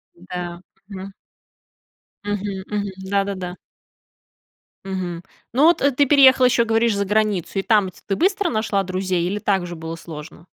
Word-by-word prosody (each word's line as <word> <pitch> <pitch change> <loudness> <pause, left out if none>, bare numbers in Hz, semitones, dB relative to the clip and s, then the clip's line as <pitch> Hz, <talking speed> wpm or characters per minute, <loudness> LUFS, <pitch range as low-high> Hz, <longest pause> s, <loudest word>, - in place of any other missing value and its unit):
Да. 180 0 -6
М-да, 175 0 -8 0.3
мгм. 195 -1 -8 1.1
Мгм, 205 -2 -3
мгм. 205 -2 -2 0.2
Да-да-да. 195 -2 -1 1.3
Мгм. 180 -3 -4 0.3
Ну, 270 +6 +3
вот, 335 0 +5
э, 280 0 +3
ты 285 +2 +3
переехала 265 -2 +7
ещё, 245 -1 +3
говоришь, 225 -1 +2
за 200 - 0
границу, 210 -2 0
и 195 - +1
там 205 -4 +3
ть - - -21
ты 195 - -1
быстро 385 0 +1
нашла 215 -3 0
друзей 185 -1 -1
или 200 +3 -1
так 195 -3 0
же 175 -1 -7
было 160 +1 -6
сложно? 160 0 -10
200 Hz, 160 wpm, -21 LUFS, 180-225 Hz, 1.3 s, переехала